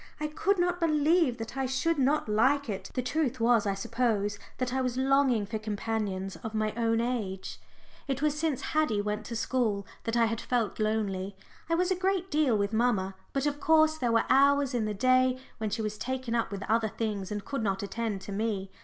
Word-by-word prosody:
I 305 - -2
could 380 +6 0
not 355 0 +1
believe 310 -4 +3
that 225 +2 -7
I 270 -1 -1
should 285 +5 0
not 275 +2 +2
like 260 +7 +2
it. 190 -1 -5
The 255 - 0
truth 265 -2 -1
was, 230 -2 +3
I 195 - 0
suppose, 205 -1 -1 0.2
that 255 -1 -2
I 265 - +1
was 250 -1 -1
longing 265 -4 +3
for 215 +2 -4
companions 205 -3 -3
of 220 0 -7
my 215 0 0
own 230 -1 +1
age. 225 -6 -3 0.5
It 270 -1 -1
was 300 0 +1
since 305 -4 -1
Haddie 305 -9 +2
went 210 0 -3
to 235 - -5
school 225 -4 0 0.2
that 230 +1 0
I 230 - +5
had 225 0 -2
felt 235 -4 -1
lonely. 200 -3 -1 0.3
I 330 - +3
was 360 +2 +1
a - - +3
great 375 0 -1
deal 295 -7 +3
with 200 +1 -1
mamma, 220 -5 +1 0.2
but 275 0 -1
of 290 0 -1
course 315 0 +4
there 240 -4 +1
were 230 0 +3
hours 280 0 +4
in 235 -3 0
the 210 -1 -2
day 255 +3 +3 0.2
when 220 -1 -1
she 220 +2 -2
was 210 0 -4
taken 260 0 -3
up 235 -1 0
with 200 -1 -5
other 220 +1 +1
things 210 -3 -3
and 205 -1 -4
could 275 -4 -3
not 195 -2 -1
attend 210 -1 -3
to 195 - -8
me. 200 -2 -2
235 Hz, 215 wpm, -29 LUFS, 210-275 Hz, 0.5 s, I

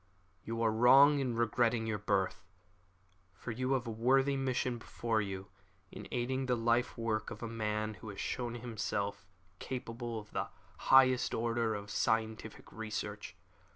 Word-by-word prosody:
"You 115 0 -3
are 110 - +3
wrong 135 +6 +7
in 125 -4 -1
regretting 115 0 +1
your 110 -2 -2
birth, 100 -1 0 0.9
for 115 - -6
you 130 +3 -1
have 130 -2 0
a 115 - -4
worthy 135 +5 +3
mission 130 -2 -1
before 115 -1 -1
you 95 -1 -5 0.4
in - - -9
aiding 130 +2 -1
the 125 - +2
life 120 +2 +1
work 115 -2 -1
of 115 0 -8
a - - -2
man 110 -1 -2
who 110 +2 -10
has 100 - -8
shown 120 -1 -3
himself 100 -5 -3 0.3
capable 120 -2 -5
of 105 -1 -9
the - - -2 0.4
highest 130 -1 +6
order 115 -1 0
of 100 0 -7
scientific 110 0 -1
research. 105 -3 -5
115 Hz, 155 wpm, -33 LUFS, 110-125 Hz, 0.9 s, wrong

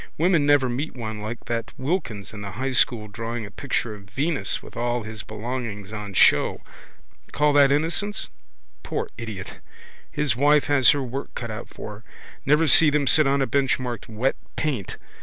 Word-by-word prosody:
Women 165 -3 +3
never 145 -3 +4
meet 130 +6 -3
one 110 -3 -5
like 110 +3 -6
that 115 -1 -3
Wilkins 130 - -3
in 105 - -7
the 100 -2 -6
high 130 +5 -2
school 120 -3 +4
drawing 115 +2 -5
a 100 - -11
picture 120 -1 -2
of 100 -1 -13
Venus 135 - -1
with - - -12
all 120 0 -1
his 110 -1 -7
belongings 110 -2 -5
on 105 -2 -6
show. - - +4 0.7
Call 150 0 +3
that 140 -1 +6
innocence? 165 +8 0 0.5
Poor - - -3
idiot! 110 -5 -7 0.5
His 145 -5 0
wife 145 +3 +4
has 140 -3 +5
her 145 -2 +3
work 130 +2 -6
cut 115 -2 -5
out 110 +2 -7
for 105 -1 -8
her. - - -22 0.4
Never 150 +3 +4
see 155 +2 +7
them 145 -1 +1
sit 155 +1 +5
on 140 0 +2
a - - +1
bench 135 0 +1
marked 125 -3 -5
Wet 115 +5 0 0.2
Paint. 135 -12 -2
125 Hz, 180 wpm, -24 LUFS, 110-145 Hz, 0.7 s, see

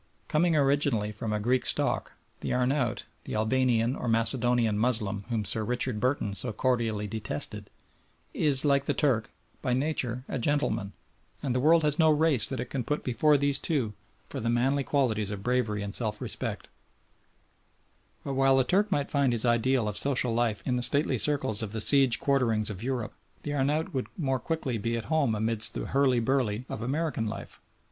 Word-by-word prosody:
Coming 165 +2 +2
originally 140 -7 +1
from 105 +1 -5
a 105 - 0
Greek 125 +4 +1
stock - - 0 0.3
the - - -4
Arnaout 125 -1 0 0.2
the - - -5
Albanian 120 +2 +1
or 125 - -5
Macedonian 115 0 +1
Moslem 105 -3 0
whom 110 -3 -2
Sir 110 +3 -1
Richard 120 0 -2
Burton 125 -4 -1
so 120 +4 0
cordially 115 -2 -1
detested 105 -7 -1 0.6
is, 145 -2 +4
like 140 -1 +2
the - - -1
Turk, 125 -7 +1 0.3
by 125 - -1
nature 130 -3 -2
a 135 - -3
gentleman, 115 -7 -1 0.5
and 135 -4 -1
the 125 - 0
world 160 +4 +4
has 150 +1 +1
no 160 -1 +5
race 155 -4 +4
that 130 - -4
it 125 - -5
can 130 -3 -2
put 150 +5 -3
before 145 +5 +2
these 140 0 +1
two 130 -10 -1 0.3
for - - -5
the 115 - -2
manly 130 +4 +1
qualities 115 -8 0
of 100 -1 -6
bravery 115 -4 0
and 100 0 -5
self 110 -3 -1
respect; - - -4 1.6
but 140 - -4
while 135 0 +4
the 130 - +4
Turk 195 +9 +1
might 145 -6 -1
find 140 -3 +2
his 115 0 -1
ideal 120 0 +2
of 105 - -2
social 125 -4 +1
life 115 -2 0
in 125 -1 0
the - - -1
stately 135 0 +1
circles 135 -7 +1
of 110 -1 -3
the 110 - -2
Seize 135 +1 +5
Quarterings 115 -6 0
of 100 -1 -6
Europe, 120 -3 -3 0.3
the 145 - -4
Arnaout 150 +5 -1
would 130 -2 -2
more 135 -6 -1
quickly 135 -8 -3
be 115 +2 -2
at 115 - -5
home 140 -8 +2
amidst 110 +1 +1
the - - -3
hurly 135 -3 +2
burly 120 -2 -1
of 110 - -5
American 135 -2 -2
life. - - -8
125 Hz, 185 wpm, -28 LUFS, 110-140 Hz, 1.6 s, no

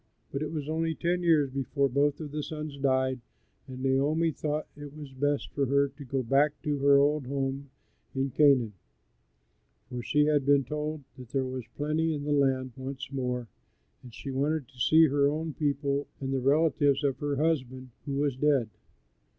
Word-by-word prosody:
But 140 - -3
it 155 - -3
was 150 -3 -4
only 160 +1 -1
ten 175 +2 0
years 155 -6 +3
before 140 +1 0
both 140 +2 +1
of 150 -3 -6
the 150 +1 -3
sons 155 -1 -6
died, 130 -1 +1 0.5
and 130 -1 -7
Naomi 145 +5 +2
thought 150 0 -3
it 145 0 -10
was 145 -3 -9
best 145 +2 -1
for 140 -2 0
her 140 +1 +3
to 140 +1 -12
go 135 0 -2
back 140 +5 +2
to 145 -2 -1
her 140 0 +6
old 145 -1 +2
home 135 0 -3 0.5
in 135 0 -1
Canaan; 130 -6 +4 1.2
for 125 -1 -4
she 150 +4 +2
had 150 -2 +2
been 140 0 +4
told 150 +2 -4 0.2
that 125 -2 -10
there 135 0 0
was 130 -2 -5
plenty 155 +2 0
in 145 - -5
the 150 - -2
land 135 -2 +2
once 130 0 -6
more, 125 -3 -2 0.5
and 125 - -12
she 135 +4 -7
wanted 140 +1 -1
to 130 -3 -19
see 160 +7 +6
her 140 -1 +3
own 155 +1 -3
people 140 0 -1
and 135 0 -3
the 135 - +1
relatives 145 0 +3
of 140 -2 0
her 145 -1 -1
husband 130 -4 -1 0.2
who 140 - -2
was 140 -2 0
dead. 135 -4 +2
140 Hz, 185 wpm, -29 LUFS, 135-150 Hz, 1.2 s, her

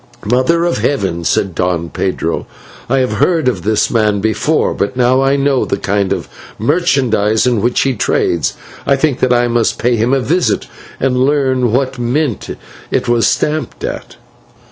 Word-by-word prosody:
"'Mother 130 +9 +2
of 175 - 0
Heaven!' 95 -11 -1
said 95 +2 0
Don 85 -1 -1
Pedro, 85 -3 -2 0.4
'I 135 - +2
have 130 -4 +1
heard 160 - +1
of 125 - 0
this 110 0 +1
man 105 -3 +2
before; 110 +9 0
but 100 - -2
now 125 +1 +3
I 135 +1 +2
know 140 -2 +1
the - - -2
kind 100 0 -1
of - - -2 0.3
merchandise 120 - +1
in 120 -4 +1
which 120 +3 +1
he 135 - +1
trades, 85 -6 0 0.3
I 140 - +4
think 140 -1 0
that 130 - +1
I 120 0 +3
must 120 -1 0
pay 120 0 +1
him 115 +3 +1
a 135 - +3
visit 170 +7 0 0.3
and 130 -1 0
learn 130 -3 +1
what 130 +1 -1
mint 125 0 -1 0.4
it - - -1
was 120 -1 +3
stamped 150 -4 -1
at.' - - -5
125 Hz, 170 wpm, -15 LUFS, 110-135 Hz, 0.4 s, I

